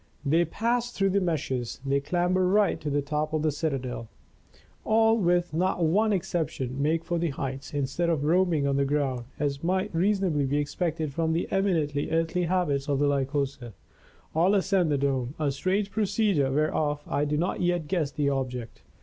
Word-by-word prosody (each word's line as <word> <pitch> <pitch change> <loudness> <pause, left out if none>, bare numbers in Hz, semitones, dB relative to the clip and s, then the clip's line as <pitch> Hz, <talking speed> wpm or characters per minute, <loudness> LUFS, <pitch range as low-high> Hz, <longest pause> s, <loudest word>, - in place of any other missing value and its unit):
They 165 +5 +3
pass 235 +7 -1
through 195 -4 +1
the 200 +1 +2
meshes, 150 -8 -2
they 140 0 +2
clamber 180 +5 +1
right 205 +2 +2
to 150 - -3
the 145 0 0
top 150 +2 -2
of 155 -1 0
the 155 - +2
citadel. 135 -6 -3 0.7
All, 225 +1 +4
with 175 -5 +1
not 180 +1 +1
one 210 +7 +3
exception, 160 -8 -2
make 160 +3 +1
for 175 -1 -1
the 170 0 0
heights, 135 0 -5
instead 145 +4 -1
of 155 -4 0
roaming 165 -2 +2
on 140 -1 +1
the 140 - +3
ground, 135 -4 -1
as 140 0 -2
might 190 +4 0
reasonably 180 -5 +1
be 145 +2 0
expected 155 0 -2
from 160 +2 0
the 165 - -1
eminently 165 -8 0
earthly 165 +2 0
habits 160 -6 0
of 140 - +2
the 145 - +2
Lycosa, 140 -3 -1 0.6
all 180 +6 +3
ascend 190 -3 +2
the 145 - +2
dome, 135 -1 -1
a 150 -3 0
strange 195 +8 -1
procedure 200 -9 +1
whereof 150 0 0
I 145 - 0
do 150 0 0
not 175 +4 -1
yet 175 -3 0
guess 160 -4 0
the 145 0 -1
object. 125 -4 -3
155 Hz, 180 wpm, -27 LUFS, 140-180 Hz, 0.7 s, All